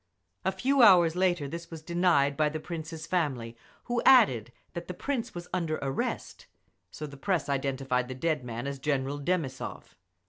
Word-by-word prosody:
A 190 - +1
few 260 +8 +2
hours 175 -7 +7
later 175 -5 +1
this 170 +4 -7
was 160 -2 -9
denied 170 -5 +2
by 150 +1 +2
the 155 +1 -4
Prince's 160 0 -6
family, 135 -11 -1 0.3
who 240 -1 -1
added 130 - +5 0.2
that 170 0 -6
the 180 - -5
Prince 265 -4 -3
was 175 0 -6
under 165 -4 0
arrest 135 0 -3 0.4
so 150 +12 -7
the 140 -1 -10
press 180 +2 0
identified 135 -2 -1
the 130 - -6
dead 155 0 -1
man 120 +1 -5
as 140 -1 -4
General 140 0 -1
Demissov. 145 -4 -3
155 Hz, 170 wpm, -29 LUFS, 135-180 Hz, 0.4 s, hours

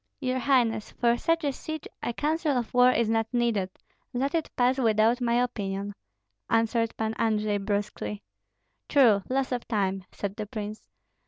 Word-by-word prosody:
"Your 260 -2 -1
highness, 240 -5 +2
for 235 -1 +2
such 330 +6 0
a 285 - +1
siege 315 +3 -6
a - - -1
counsel 300 +2 0
of 240 -2 -3
war 250 0 +6
is 235 -2 +1
not 225 0 +1
needed, 235 -6 +1 0.4
let 270 +4 -1
it 330 -2 0
pass 255 +2 +2
without 225 +1 +3
my 235 -1 +2
opinion," 205 -5 -1 0.6
answered 230 0 +1
Pan 220 0 -1
Andrei, 215 -2 +1
brusquely. 200 - -3 0.7
"True, 230 -8 +5
loss 265 0 0
of 245 -1 -3
time!" 195 -4 -1
said 200 0 -5
the 215 -2 -4
prince. 215 0 -6
230 Hz, 160 wpm, -27 LUFS, 210-255 Hz, 0.7 s, war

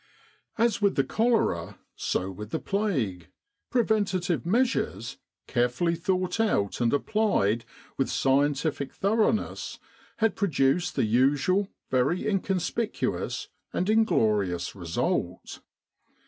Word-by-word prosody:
As 230 -2 +2
with 200 -1 +3
the 135 - +3
cholera 130 - 0 0.2
so 95 +1 -2
with 105 +3 -8
the 160 - -1
plague, 135 - -1 0.4
preventive 200 -8 +1
measures, 185 - 0 0.3
carefully 125 +8 +1
thought 185 +3 -1
out 110 - +1
and 115 -1 +3
applied 140 - +1 0.3
with 135 - +1
scientific 140 +1 +1
thoroughness, 215 +2 0 0.4
had 225 -3 +2
produced 165 -3 +1
the - - +2
usual 145 - +2 0.2
very 135 +10 +1
inconspicuous 195 +2 -1 0.2
and 185 +4 +1
inglorious 105 - +2
result. 85 -4 -2
170 Hz, 100 wpm, -27 LUFS, -, 0.4 s, with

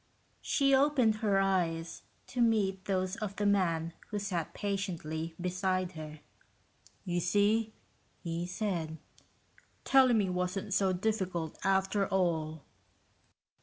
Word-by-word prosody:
She 275 -1 +2
opened 265 -5 +4
he 215 0 -2
eyes 185 -4 +1 0.2
to 250 - -3
meet 200 -5 +2
those 185 +1 -1
of 210 -3 -4
the 205 - -1
man 170 -5 +1
who 210 - -4
sat 190 -5 -2
patiently 170 -5 -3
beside 185 0 -1
her. 155 -2 -9 0.8
"You 175 -1 0
see," 205 +5 +2 0.5
he 170 0 -3
said, 175 -5 -3 0.9
"telling 260 -3 +5
me 205 -3 +2
wasn't 185 +2 -2
so 195 -1 +3
difficult, 185 -4 -1
after 195 +1 +2
all." 160 -5 0
190 Hz, 115 wpm, -31 LUFS, 170-205 Hz, 0.9 s, telling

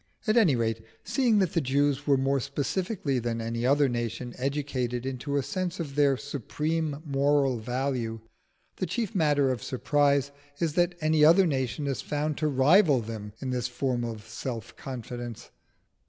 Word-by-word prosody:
At 215 -1 +2
any 195 - +5
rate, 115 -1 -1 0.2
seeing 245 -6 +2
that 190 -5 +2
the 165 - +2
Jews 140 +1 +1
were 140 -2 +5
more 135 +1 +1
specifically 145 - -2
than 115 -1 -2
any 115 +1 -2
other 140 +1 +4
nation 120 0 -3
educated 130 -3 -2
into 135 +2 -2
a 140 - +1
sense 185 +2 -3
of 150 -5 -4
their 140 -2 +3
supreme 150 +3 -3
moral 140 -3 +2
value, 120 -1 -2 0.6
the 185 - -2
chief 230 -3 -2
matter 145 -7 +3
of 125 -4 -3
surprise 140 +1 +1 0.3
is 165 -3 0
that 175 +1 +2
any 155 0 +3
other 170 +5 +7
nation 135 -1 -1
is 135 -3 -2
found 150 +1 -2
to 155 - +1
rival 145 +2 +5
them 105 -2 -6
in 130 - -3
this 125 -1 -1
form 125 -1 -1
of 110 -2 -6
self 115 0 -6
confidence. 120 -2 -7
140 Hz, 165 wpm, -28 LUFS, 125-150 Hz, 0.6 s, other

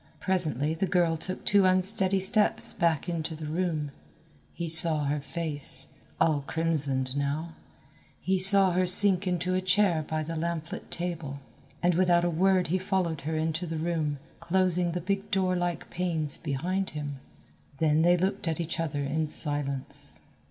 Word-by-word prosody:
Presently 160 - -1
the 175 +4 -2
girl 175 -2 +1
took 185 +3 -5
two 200 -1 +3
unsteady 190 +1 +8
steps 210 +3 +1
back 165 -2 -1
into 165 -2 -4
the 155 0 -8
room. 155 -2 -3 0.6
He 170 - -6
saw 160 -1 +3
her 145 +1 -2
face, 150 -1 -4 0.3
all 155 -3 +1
crimsoned 140 -5 -2
now, 145 +4 -3 0.7
he 190 0 -1
saw 195 0 +4
her 180 +1 0
sink 190 0 +6
into 180 0 -2
a 185 - 0
chair 185 -3 +1
by 155 0 -3
the 165 +2 -6
lamplit 165 0 -5
table, 165 -5 -6 0.4
and 175 0 +3
without 175 0 +2
a 175 - 0
word 185 0 +1
he 185 +3 0
followed 185 -4 -2
her 160 +3 -4
into 160 +2 -3
the 165 0 -5
room, 155 -3 -2 0.2
closing 175 0 0
the 180 - -4
big 195 +3 -3
door 190 -3 0
like 175 -1 -3
panes 165 -5 -1
behind 175 +6 -3
him. 145 -2 -6 0.6
Then 155 +1 +1
they 175 +2 +3
looked 190 +1 -2
at 165 +1 -2
each 170 -1 -4
other 145 -3 -3
in 155 +3 -2
silence. 145 -3 -1
170 Hz, 160 wpm, -27 LUFS, 155-185 Hz, 0.7 s, unsteady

